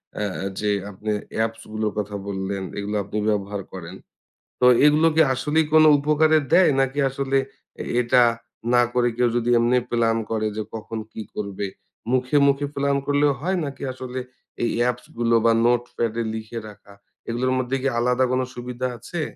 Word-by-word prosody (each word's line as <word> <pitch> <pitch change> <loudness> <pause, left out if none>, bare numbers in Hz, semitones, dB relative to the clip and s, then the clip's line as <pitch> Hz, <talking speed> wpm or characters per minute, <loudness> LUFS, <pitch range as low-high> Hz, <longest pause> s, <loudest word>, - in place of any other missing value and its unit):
অ্যা 100 -2 -3
যে, 105 - 0 0.2
আপনি 105 +2 -7 0.3
অ্যাপস 115 0 -1
গুলোর 110 -1 -1
কথা 105 0 -4
বললেন 95 0 -3
এগুলো 100 +1 -3
আপনি 100 +2 -5
ব্যবহার 100 -1 -2
করেন। 90 -1 -8 0.7
তো - - +5 0.2
এগুলো 150 +2 +5
কি 160 - +6
আসলেই 150 +5 +1
কোন 155 0 +7 0.2
উপকারে 155 +2 +3 0.2
দেয় 185 -3 +6
নাকি 135 +2 -1
আসলে 135 0 -1 0.6
এটা 125 +1 +4 0.5
না 120 - +6
করে 120 -1 +2
কেউ 125 0 +3
যদি 120 0 -1
এমনি 120 +2 +3
প্লান 115 -1 +2
করে 110 -1 0
যে 110 - -1
কখন 110 0 -5
কি - - -6
করবে? 100 -1 -4 0.4
মুখে, 130 +2 +2
মুখে 140 +1 +2
প্লান 140 0 +1
করলেও 145 0 +3
হয় 185 +4 0
নাকি 140 -1 -7
আসলে 130 0 -6 0.4
এই 120 - +1
অ্যাপসগুলো 120 -1 0
বা 115 - +6
নোটপ্যাডে 120 -1 0
লিখে 110 +1 -5
রাখা 100 -1 -16 0.4
এগুলোর 125 +2 0
মধ্যে 130 +1 -1
কি 135 - 0
আলাদা 125 +2 +2
কোন 130 0 +1
সুবিধা 125 +1 -4
আছে? 140 +9 -5
120 Hz, 160 wpm, -23 LUFS, 110-135 Hz, 0.7 s, কোন